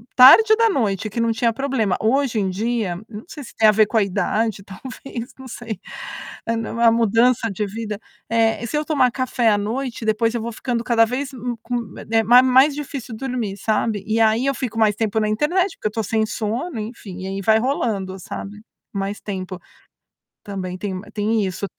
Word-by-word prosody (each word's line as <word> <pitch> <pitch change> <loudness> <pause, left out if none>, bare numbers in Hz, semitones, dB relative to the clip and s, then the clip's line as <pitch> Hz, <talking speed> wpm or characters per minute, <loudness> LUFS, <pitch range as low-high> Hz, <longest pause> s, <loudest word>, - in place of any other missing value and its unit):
tarde 435 - +9
da 455 0 +3
noite 215 - 0
que 210 - -4
não 230 0 +2
tinha 230 +1 +1
problema. 235 -6 0
Hoje 245 0 +1
em 195 -2 0
dia, 215 -1 -1
não 215 0 -9
sei 305 -6 -9
se - - -12
tem 220 - +5
a - - +8
ver 215 0 +4
com 225 - 0
a 215 - +5
idade, 205 +2 -1
talvez, 250 +4 -8
não 265 -1 -10
sei, 230 -3 -6 0.7
é 230 - +1
na 225 0 -3
uma 230 0 +5
mudança 230 +1 +3
de 205 +2 -2
vida. 210 0 -5 0.3
Eh, 230 0 +2
se 300 - -2
eu 300 - -1
tomar 270 -6 +2
café 250 -2 +1
à 205 - +3
noite, 230 +3 -3
depois 220 +1 +1
eu 235 - -1
vou 235 +1 -4
ficando 240 +1 -2
cada 230 -2 +4
vez 260 +4 -3 0.3
com 235 -4 -4 0.2
eh, 225 0 +4
ma 240 +4 +7
mais 260 +3 +5
difícil 275 -5 -6
dormir, 245 -6 -3
sabe. 215 -1 0
E 220 +1 +1
aí 220 +3 +3
eu 275 0 +1
fico 235 -3 -3
mais 215 -2 +3
tempo 220 0 0
na 215 - +1
internet, 340 - +1
porque - - -2
eu - - -16
tô 225 - -1
sem 220 +2 +1
sono, 230 +7 -3
enfim, 210 -4 -7
e - - -4
aí 195 +1 -4
vai 220 +3 +4
rolando, 215 -7 -1
sabe. 205 +3 -7 0.3
Mais 200 +1 -3
tempo. 185 -2 -5 0.8
Também 185 -2 -5
tem 195 0 -4
ma 185 +3 -7
tem 215 +1 0
isso 190 +1 -3
225 Hz, 205 wpm, -21 LUFS, 210-250 Hz, 0.8 s, tarde